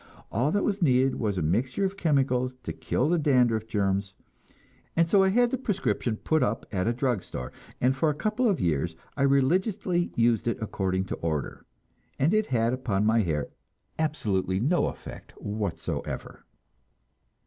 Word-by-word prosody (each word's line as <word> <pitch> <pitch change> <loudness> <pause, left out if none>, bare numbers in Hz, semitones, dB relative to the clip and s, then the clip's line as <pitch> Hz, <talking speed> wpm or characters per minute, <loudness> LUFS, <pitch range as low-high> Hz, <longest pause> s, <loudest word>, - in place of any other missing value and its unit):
All 125 +8 +1
that 205 - +1
was 205 -1 -1
needed 130 -3 +3
was 105 -4 -1
a 90 - 0
mixture 125 - 0
of 190 0 -2
chemicals 130 -7 +1
to - - -4
kill 130 - -1
the 175 +1 +2
dandruff 125 -7 +2
germs; 100 -2 -1 0.8
and 165 0 +3
so 195 +3 +4
I 190 - +4
had 240 +4 +3
the 260 - -1
prescription 130 - -1
put 155 +5 +1
up 115 -3 0
at 95 -1 -1
a - - +3
drug 120 -4 0
store, 60 -6 -7 0.3
and 130 +2 +2
for 155 +4 +2
a 150 - -1
couple 215 +9 +1
of 195 - +1
years 80 0 0 0.2
I 140 - -3
religiously 175 - +2
used 115 -1 +2
it 115 - 0
according 95 -3 -1
to - - -4
order, 80 -4 -3 0.5
and 155 +8 +2
it 215 0 +2
had 115 -2 +1
upon 105 -6 0
my 110 +1 +4
hair 80 -6 -1 0.5
absolutely 100 -12 0
no 155 - +2
effect - - -9
whatever. 90 -7 -4
125 Hz, 170 wpm, -27 LUFS, 100-160 Hz, 0.8 s, so